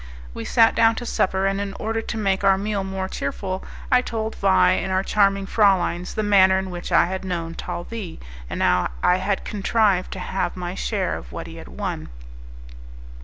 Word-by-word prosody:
We 115 - -6
sat 225 -1 +4
down 225 0 +4
to 240 - -5
supper, 190 -3 0
and 195 0 0
in 200 -1 -4
order 225 +1 -2
to 220 - -5
make 195 -2 0
our 195 -1 +5
meal 200 0 -2
more 190 0 -3
cheerful, 185 +4 -4 0.3
I 250 - +6
told 220 -2 -3
Vais 90 - +3
and 190 - -3
our 190 0 +1
charming 195 -1 +2
frauleins 190 -4 +2
the 215 - 0
manner 190 -2 +5
in 190 -1 -3
which 175 +1 -6
I 170 - +5
had 190 +2 -4
known 170 -3 -3
Talvis, 180 +2 -6 0.3
and - - -2
how - - +3
I 180 - +4
had 190 +1 -2
contrived 205 -2 +1
to 190 - -7
have 185 0 -2
my 175 -1 -4
share - - -1
of - - -13
what - - -6
he - - -10
had - - -10
won. - - -5
190 Hz, 195 wpm, -23 LUFS, 185-210 Hz, 0.3 s, I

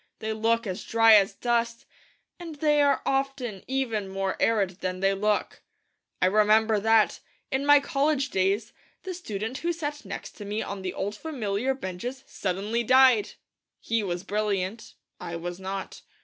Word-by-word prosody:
They 220 0 -3
look 230 +2 +1
as 185 -3 -4
dry 225 0 +5
as 200 -1 +5
dust, 235 -1 -1 0.5
and 335 -3 -8
they 295 0 +3
are 280 -1 +2
often 270 -7 -2
even 235 -7 -1
more 195 0 -2
arid 195 -5 +1
than 185 0 -3
they 195 +1 +2
look. 210 +1 -1 0.6
I - - +6
remember 215 +2 +4
that, 225 +1 +3 0.3
in 270 +2 -1
my 290 0 +8
college 280 0 0
days, 195 +3 0 0.3
the 375 - -5
student 225 - -5
who 345 - -1
sat 295 -3 -4
next - - -7
to 210 - -7
me 210 +2 -2
on 200 -1 -6
the 185 -1 -4
old 205 +2 -3
familiar 250 -3 -2
benches 245 +5 -6
suddenly 200 +5 -2
died. 255 -3 +5 0.5
He 230 -1 -1
was 180 -3 -3
brilliant; 205 0 -2 0.2
I 170 - -6
was 175 +2 -5
not. 190 0 -6
220 Hz, 160 wpm, -26 LUFS, 195-265 Hz, 0.6 s, my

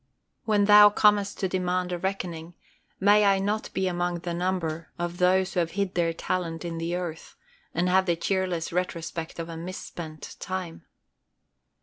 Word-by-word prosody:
When 210 -2 +3
thou 210 0 +9
comest 205 -1 +3
to 190 - +2
demand 180 -1 -1
a 175 - -2
reckoning, 175 -3 -4 0.4
may 205 +2 +5
I 200 -1 +4
not 205 +3 -2
be 190 - -1
among 175 -1 -1
the 175 -1 -3
number 170 -2 -2
of 175 0 -4
those 185 +1 +3
who 180 - +1
have 165 -1 -1
hid 200 -1 -1
their 170 -1 +1
talent 165 0 -3
in 165 -1 -4
the 170 +1 -2
earth, 170 -3 -6 0.4
and 175 +2 +1
have 190 +1 +3
the 170 - +2
cheerless 180 -1 -1
retrospect 170 -2 -3
of 165 -1 -4
a 165 - -7
misspent 165 -2 -7
time. 185 -3 -5
180 Hz, 165 wpm, -26 LUFS, 170-190 Hz, 0.4 s, thou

